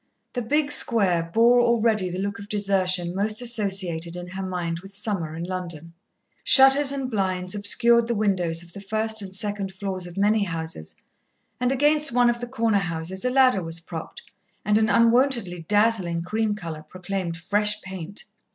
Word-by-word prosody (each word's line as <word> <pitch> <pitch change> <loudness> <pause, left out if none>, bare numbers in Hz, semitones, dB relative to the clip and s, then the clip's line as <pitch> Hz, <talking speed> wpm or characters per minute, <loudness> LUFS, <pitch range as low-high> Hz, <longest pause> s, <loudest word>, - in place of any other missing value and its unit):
The 245 - -3
big 290 +5 0
square 200 - +4
bore 235 +4 +4
already 225 -5 +1
the 180 - -6
look 200 +4 -4
of 200 -1 -11
desertion 185 -4 0
most 210 +3 +1
associated 190 -8 0
in 180 0 -8
her 190 +1 -6
mind 175 -3 -4
with 195 +2 -12
summer 195 -6 -3
in 165 - -6
London. 170 -3 -6 0.5
Shutters 270 +1 +6
and 275 -2 -3
blinds 185 -3 -1
obscured 235 +3 +3
the 235 - -1
windows 180 -5 0
of 170 0 -13
the 200 - -9
first 220 +2 -1
and 195 -2 -7
second 200 0 -3
floors 190 -2 -4
of 175 +1 -12
many 210 +1 +2
houses, 160 - -5 0.6
and 250 0 0
against 295 +2 +2
one 245 0 +3
of 240 - -5
the 245 - -5
corner 230 -4 0
houses 175 +1 -4
a 250 - +1
ladder 255 -5 +3
was 165 0 -3
propped 165 - -9 0.4
and 210 +1 +2
an 220 0 +1
unwontedly 230 -7 +2
dazzling 205 -6 +1
cream 215 +3 -2
colour 165 -6 -7
proclaimed 180 +1 -5
fresh 210 +4 +1
paint. 190 +1 -6
200 Hz, 170 wpm, -23 LUFS, 175-230 Hz, 0.6 s, Shutters